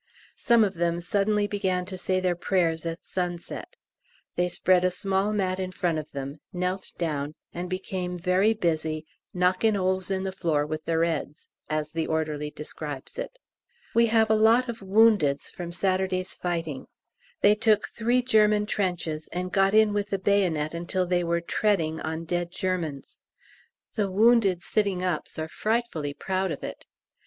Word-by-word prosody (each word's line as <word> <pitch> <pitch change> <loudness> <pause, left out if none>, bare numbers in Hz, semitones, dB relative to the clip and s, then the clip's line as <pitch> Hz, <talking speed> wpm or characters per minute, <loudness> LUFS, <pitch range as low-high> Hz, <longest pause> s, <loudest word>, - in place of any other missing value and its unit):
Some 235 -2 +5
of 200 -2 0
them 170 -1 0
suddenly 205 +4 +1
began 190 -3 -1
to 190 0 -6
say 185 0 0
their 180 -1 +1
prayers 170 -2 0
at 165 +1 -5
sunset. 175 -2 -4 0.6
They 180 0 +1
spread 180 +1 +3
a 185 - +4
small 195 +2 0
mat 190 -3 0
in 185 -1 -3
front 170 -3 0
of 150 - -8
them, 140 +1 -5
knelt 180 +1 -2
down, 150 -3 -2 0.2
and 175 +1 -4
became 185 -1 -3
very 185 +5 +2
busy 160 -4 -1 0.3
"knockin' 185 +4 +2
'oles 185 0 0
in 190 -1 -1
the 190 - -2
floor 165 -6 0
with 155 +1 -5
their 165 0 +2
'eads," 155 -2 -3 0.2
as 155 0 -1
the 165 0 -2
orderly 155 -2 -1
describes 150 - -7
it. - - -5 0.6
We 235 0 +5
have 220 -1 +3
a - - +5
lot 225 +4 +4
of 235 -1 -5
woundeds 195 -8 +3
from 175 -1 -6
Saturday's 185 0 0
fighting. 165 -5 -3 0.5
They 205 - +6
took 215 0 +2
three 240 +2 +1
German 210 -3 +4
trenches, 175 -7 -2
and 180 +1 -3
got 195 +1 +3
in 215 -1 +5
with 205 0 -1
the 195 - 0
bayonet 180 -6 +1
until 175 +2 -1
they 175 0 +1
were 170 0 0
"treading" 170 -3 0
on 160 +1 -4
dead 175 0 -1
Germans! 175 -8 -3 0.7
The 205 -3 0
wounded 205 -3 +4
sitting 200 -4 0
ups 180 -4 -2
are 155 0 -3
frightfully 210 -9 -2
proud 190 0 -1
of 150 - -5
it. - - -7
185 Hz, 165 wpm, -26 LUFS, 165-205 Hz, 0.7 s, They